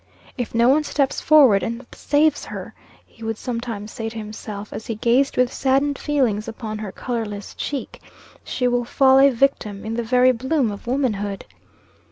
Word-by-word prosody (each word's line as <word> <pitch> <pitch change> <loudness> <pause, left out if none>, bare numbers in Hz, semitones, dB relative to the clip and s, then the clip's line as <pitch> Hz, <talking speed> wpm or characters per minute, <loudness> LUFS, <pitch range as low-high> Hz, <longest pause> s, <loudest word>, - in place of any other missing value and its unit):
"If 245 -3 -5
no 235 +1 +4
one 290 +4 +4
steps 280 -2 -1
forward 270 -10 +6
and 230 +6 -4
saves 295 +1 +1
her," - - -8 0.3
he 225 - -16
would 225 -1 -3
sometimes 230 -4 -5
say 225 -1 -4
to 225 - -9
himself, 210 -1 -7
as 220 - -7
he 225 - -2
gazed 245 +5 +2
with 250 0 +2
saddened 275 +1 +1
feelings 245 -8 0
upon 220 -1 -6
her 210 -3 -5
colorless 215 -3 -5
cheek, 280 -3 -5 0.4
"she 250 - -1
will 245 0 +1
fall 265 +2 +4
a 275 +1 +7
victim 230 -6 0
in 220 - -3
the 235 - -1
very 250 +2 +4
bloom 260 0 0
of 200 +3 -9
womanhood." 210 -7 -1
240 Hz, 175 wpm, -22 LUFS, 220-270 Hz, 0.4 s, a